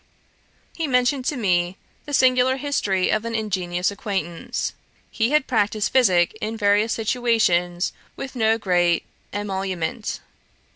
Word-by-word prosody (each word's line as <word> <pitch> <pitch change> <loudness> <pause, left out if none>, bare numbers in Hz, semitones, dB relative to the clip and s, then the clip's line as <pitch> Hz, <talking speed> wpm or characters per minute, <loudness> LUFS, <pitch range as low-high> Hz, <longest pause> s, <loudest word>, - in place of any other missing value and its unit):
He 325 -2 -2
mentioned 250 0 +1
to 290 - -1
me 180 -4 +1 0.3
the 290 - -7
singular 255 0 +4
history 205 -10 0
of 215 0 +1
an 230 0 -3
ingenious 185 -4 -1
acquaintance. 190 -5 -3 0.4
'He 225 +1 +1
had 300 -1 +3
practised 215 -2 0
physick 190 -9 +4
in 220 +1 -3
various 205 +1 +3
situations 215 -7 +1 0.2
with 270 0 -7
no 225 -2 +3
great 175 -5 +1 0.3
emolument. 195 0 -3
215 Hz, 125 wpm, -23 LUFS, 185-245 Hz, 0.4 s, singular